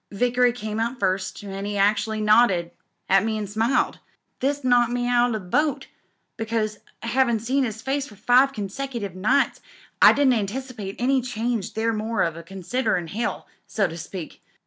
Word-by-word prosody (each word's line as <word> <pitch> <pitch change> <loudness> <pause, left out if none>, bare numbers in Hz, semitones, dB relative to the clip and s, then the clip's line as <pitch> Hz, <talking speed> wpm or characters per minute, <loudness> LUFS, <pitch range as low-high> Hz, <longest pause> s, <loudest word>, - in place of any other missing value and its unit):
Vickery 245 +3 +2
came 220 -3 -5
out 235 +3 -1
first, 190 +1 -1
an' 195 -1 -6
'e 205 0 -3
actually 215 +2 +1
nodded 210 -5 +4 0.4
at 195 0 +4
me 220 0 -1
an' 210 - -3
smiled. 220 +6 0 0.4
This 280 +1 -1
knocked 245 -1 +3
me 245 0 -1
out 245 0 +3
o' - - -2
the 220 - -2
boat, 275 +11 0 0.5
because, 220 -1 -2 0.2
havin' 235 -1 +2
seen 260 +5 0
'is 220 -1 -6
face 275 +1 -1
for 210 - -14
five 245 +6 +4
consecutive 220 -1 -5
nights, 210 +9 +1 0.4
I - - +9
didn't 280 -3 +3
anticipate 220 -1 -4
any 260 +2 +2
change 235 -3 -3
there 225 +1 0
more 220 +1 0
than 160 - -13
a - - -7
condenser 195 +8 -2
in 170 -2 -5
hoL> 230 +7 -3 0.2
so 210 - 0
to 165 - -8
speak. 170 0 -8
225 Hz, 175 wpm, -24 LUFS, 200-245 Hz, 0.5 s, I